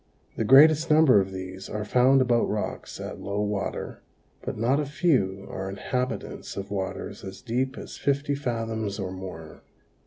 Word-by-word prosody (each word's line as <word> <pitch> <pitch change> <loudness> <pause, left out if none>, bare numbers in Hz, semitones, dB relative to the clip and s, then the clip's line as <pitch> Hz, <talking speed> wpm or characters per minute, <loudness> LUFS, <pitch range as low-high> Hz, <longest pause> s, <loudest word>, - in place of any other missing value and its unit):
The - - -1
greatest 155 +7 +7
number 150 -9 +6
of 95 0 -4
these 95 0 -7
are 105 -1 -3
found 130 +4 +4
about 120 -2 +2
rocks 105 0 -4
at - - -6
low 100 +1 -3
water 105 -1 -3 0.4
but - - -5
not 125 +6 +2
a 150 - 0
few 120 - +1
are 95 0 -5
inhabitants 125 +5 -4
of 100 0 -5
waters 95 -1 -4
as 95 0 -8
deep 130 +4 -2
as - - -8
fifty 140 +1 0
fathoms 115 -6 -2
or 95 -3 -4
more. 90 -4 -8
110 Hz, 160 wpm, -26 LUFS, 95-135 Hz, 0.4 s, greatest